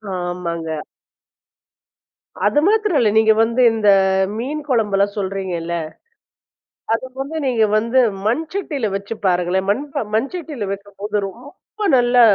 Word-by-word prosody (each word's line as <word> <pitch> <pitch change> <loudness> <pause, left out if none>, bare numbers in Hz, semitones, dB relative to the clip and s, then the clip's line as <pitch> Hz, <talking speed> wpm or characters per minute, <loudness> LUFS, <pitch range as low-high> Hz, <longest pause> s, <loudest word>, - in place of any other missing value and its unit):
ஆமாங்க. 170 -3 -3 1.6
அது 295 - +3
மாத்திரம் 425 -5 +2
இல்ல. 225 - +3
நீங்க 220 0 +6
வந்து 230 +3 +1
இந்த 220 -2 +2 0.5
மீன் 280 +6 -3
குழம்புல்லாம் 205 -4 +1
சொல்கிறீங்கல்ல. 185 -4 -3 1.2
அது 225 - -1 0.2
வந்து 295 +4 -5
நீங்க 235 -4 +3
வந்து 230 +4 +2 0.3
மண் 240 +9 +1
சட்டில 290 - -2
வச்சு 200 +3 -4
பாருங்களேன். 180 +1 +1
மண்பா 280 +6 -1
மண் 235 +5 0
சட்டில 290 - -5
வைக்கும்போது, 205 +1 -6
ரொம்ப 285 - -15 0.2
நல்லா 245 0 +4
220 Hz, 115 wpm, -19 LUFS, 195-270 Hz, 1.6 s, நீங்க